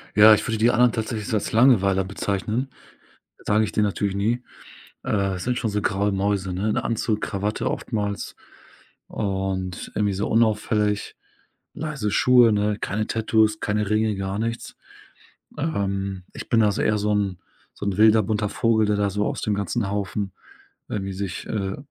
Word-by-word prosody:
Ja, 110 +1 +9
ich - - +1
würde 115 -1 -1
die 115 +3 +4
anderen 120 0 +4
tatsächlich 110 -1 -3
als 105 - -1
Langweiler 100 -6 +4
bezeichnen, 105 +6 -2 0.8
sage 105 +1 +3
ich 105 - -2
denen 105 -1 +2
natürlich 100 -1 -1
nie. 115 +5 0 0.6
Äh, 100 -3 0
sind 125 +5 -1
schon 115 -4 -1
so 105 0 -1
graue 100 +1 0
Mäuse, 95 -1 -1
ne, 105 +4 0
Anzug, 115 -1 -1
Krawatte 105 +1 -2
oftmals 105 -3 -3 0.7
und 95 -3 -3
irgendwie 105 -1 +1
so 100 +2 -2
unauffällig. 105 -2 +1 0.6
Leise 145 -10 -3
Schuhe, 125 -2 +5
ne, 105 0 0
keine 110 +2 -2
Tattoos, 110 -1 +2
keine 105 0 -1
Ringe, 110 -1 +1
gar 95 +1 -3
nichts. 115 +1 -4 0.8
Ähm, 100 - -2
ich - - -8
bin 115 - +4
da 105 -1 +4
so - - -2
eher 105 -1 +2
so 105 +1 0
'n 100 -3 0 0.4
so 100 - -6
'n 100 -2 -1
wilder 110 0 +6
bunter 105 0 -1
Vogel, 110 -3 +2
der 105 0 +1
da 100 -1 +1
so 105 +2 -1
aus - - -3
dem 105 - 0
ganzen 100 +1 -2
Haufen 100 -1 -3 0.6
irgendwie 95 -2 -3
sich, 95 -2 -5
äh, 95 -2 -3
105 Hz, 165 wpm, -23 LUFS, 100-110 Hz, 0.8 s, Ja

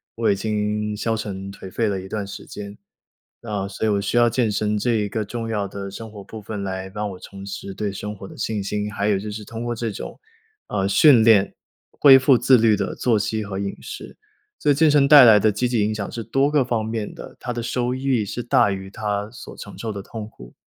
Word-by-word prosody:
我 115 -1 +1
已 100 - +3
经 105 +1 -2
消 115 +1 -1
沉 100 -3 -5
颓 95 -1 -10
废 115 +2 0
了 95 -2 -2
一 95 - -10
段 105 -2 -3
时 100 - -9
间。 100 0 -9 0.6
那 105 -4 -3
所 110 +2 -2
以 - - +2
我 100 -1 +1
需 120 - -1
要 120 0 +5
健 115 -2 +1
身 105 +1 0
这 120 +4 0
一 105 -1 0
个 110 +1 -2
重 115 +2 -5
要 105 -3 -1
的 100 0 -6
生 110 +2 -9
活 105 -2 -10
部 110 - -9
分， 105 0 -6
来 95 -1 -4
帮 105 +1 -4
我 90 - -9
重 100 +1 -10
拾 100 0 -6
对 105 0 -3
生 105 +1 -5
活 95 -1 -10
的 - - -13
信 105 -2 -2
心。 105 +1 -3
还 100 0 -1
有 105 -2 +2
就 105 +2 -5
是 105 0 -7
通 115 0 -6
过 120 0 -2
这 115 -1 -3
种 100 - -8 0.5
呃， 95 -2 -1
训 130 -2 +6
练， 105 -4 +4 0.4
恢 135 -2 +7
复 130 -1 +5
自 130 +1 +5
律 110 -2 +4
的 - - -2
作 115 -4 +1
息 110 +1 -2
和 95 -1 -5
饮 100 0 -4
食。 - - -9 0.4
所 145 - +3
以 - - +3
健 155 +1 +4
身 145 -2 +4
带 145 -2 +10
来 110 -3 +8
的 110 +1 +3
积 120 +5 -1
极 120 -2 0
影 110 +1 0
响 100 -2 -4
是 115 -2 -5
多 135 +6 +1
个 145 -3 +3
方 120 -3 -1
面 110 -1 -3
的， - - -10
它 125 - -4
的 120 -1 -4
收 125 +1 -1
益 130 -4 0
是 120 +4 -5
大 120 - +3
于 95 -1 -5
它 105 -1 -2
所 - - -11
承 - - -9
受 115 - -4
的 100 -2 -6
痛 110 +1 -7
苦， - - -14
105 Hz, 270 characters per minute, -22 LUFS, 100-115 Hz, 0.6 s, 带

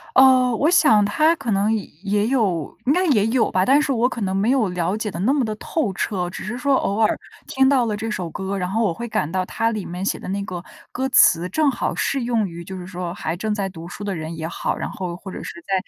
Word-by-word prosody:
呃， 255 -2 +6
我 305 - +3
想 220 - +5
他 310 +11 +3
可 275 -6 -6
能 205 +3 +2 0.3
也 205 +2 +1
有 195 - 0
应 275 - +4
该 365 +2 +2
也 215 -8 +3
有 235 0 +2
吧， 185 0 +2
但 280 +3 +5
是 295 - 0
我 245 0 +2
可 235 -3 -5
能 190 -1 -1
没 210 +6 +2
有 235 -8 +2
了 180 +2 -1
解 215 -1 -3
得 185 - -6
那 255 +8 +3
么 280 -4 +1
地 215 -1 -2
透 235 -1 -2
彻， 180 -2 -2
只 - - -7
是 215 +5 -4
说 275 +2 +2
偶 205 -2 0
尔 215 - +3 0.3
听 265 0 +3
到 260 -4 +3
了 210 -1 -2
这 225 +1 -4
首 180 -5 -3
歌， 190 +4 -4
然 180 -1 -2
后 225 +3 0
我 185 -6 +1
会 235 +7 -6
感 210 -9 -1
到 185 0 0
它 225 +4 -1
里 210 -4 -3
面 180 +3 -5
写 - - -1
的 - - -9
那 200 +1 -2
个 180 -3 -6 0.3
歌 265 +1 -2
词， 175 -6 +5
正 310 -2 +2
好 - - -2
适 275 -2 0
用 225 -4 +1
于 170 0 -8
就 190 +2 -7
是 180 - -7
说 180 -2 -5
还 160 +2 -3
正 215 +3 -2
在 200 -2 -1
读 170 -2 -9
书 205 - -8
的 200 -2 -2
人 160 +1 -6
也 160 0 -4
好， - - -3
然 - - -3
后 180 -2 -5
或 190 0 -9
者 - - -7
是 170 - -8
在 195 - -3
210 Hz, 290 characters per minute, -22 LUFS, 185-245 Hz, 0.3 s, 呃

